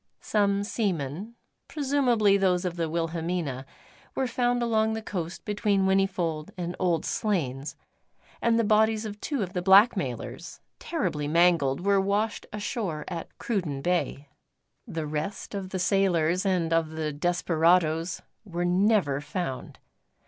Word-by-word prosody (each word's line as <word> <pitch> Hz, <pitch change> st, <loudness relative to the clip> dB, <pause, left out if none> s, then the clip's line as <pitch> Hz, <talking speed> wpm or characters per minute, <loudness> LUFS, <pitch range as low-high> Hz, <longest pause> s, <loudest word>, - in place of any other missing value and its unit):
Some 200 Hz, -1 st, +1 dB
seamen 195 Hz, -, -3 dB, 0.3 s
presumably 260 Hz, -8 st, +2 dB
those 185 Hz, -2 st, +2 dB
of 175 Hz, -1 st, -2 dB
the 165 Hz, -2 st, -2 dB
Wilhelmina 165 Hz, -4 st, -2 dB, 0.5 s
were 265 Hz, -, 0 dB
found 245 Hz, -1 st, 0 dB
along 220 Hz, -1 st, +2 dB
the 220 Hz, -, -3 dB
coast 175 Hz, -4 st, -5 dB
between 205 Hz, -2 st, +1 dB
Whinnyfold 190 Hz, -5 st, 0 dB
and 175 Hz, 0 st, -4 dB
Old 170 Hz, -4 st, +1 dB
Slains, 150 Hz, -, -2 dB, 0.7 s
and 230 Hz, -1 st, +3 dB
the 230 Hz, -, +3 dB
bodies 220 Hz, +1 st, +3 dB
of 210 Hz, -1 st, -7 dB
two 280 Hz, -8 st, -1 dB
of 180 Hz, -1 st, -6 dB
the 180 Hz, -, -1 dB
blackmailers, 190 Hz, -, +2 dB, 0.2 s
terribly 150 Hz, -1 st, -2 dB
mangled, 165 Hz, -2 st, +3 dB
were 200 Hz, -1 st, +4 dB
washed 205 Hz, +3 st, -1 dB
ashore 205 Hz, -, -3 dB
at 170 Hz, -3 st, -7 dB
Cruden 170 Hz, -12 st, -2 dB
Bay. 175 Hz, -5 st, -1 dB, 0.6 s
The 160 Hz, -1 st, -4 dB
rest 155 Hz, +9 st, -4 dB
of 195 Hz, -2 st, -4 dB
the 190 Hz, -, -3 dB
sailors 180 Hz, -1 st, +2 dB
and 170 Hz, -3 st, +1 dB
of 165 Hz, -1 st, +2 dB
the 155 Hz, -1 st, -3 dB
desperadoes 170 Hz, +1 st, +1 dB, 0.2 s
were 175 Hz, -4 st, -3 dB
never 180 Hz, -6 st, +2 dB
found. 150 Hz, -5 st, -5 dB
180 Hz, 135 wpm, -27 LUFS, 160-205 Hz, 0.7 s, were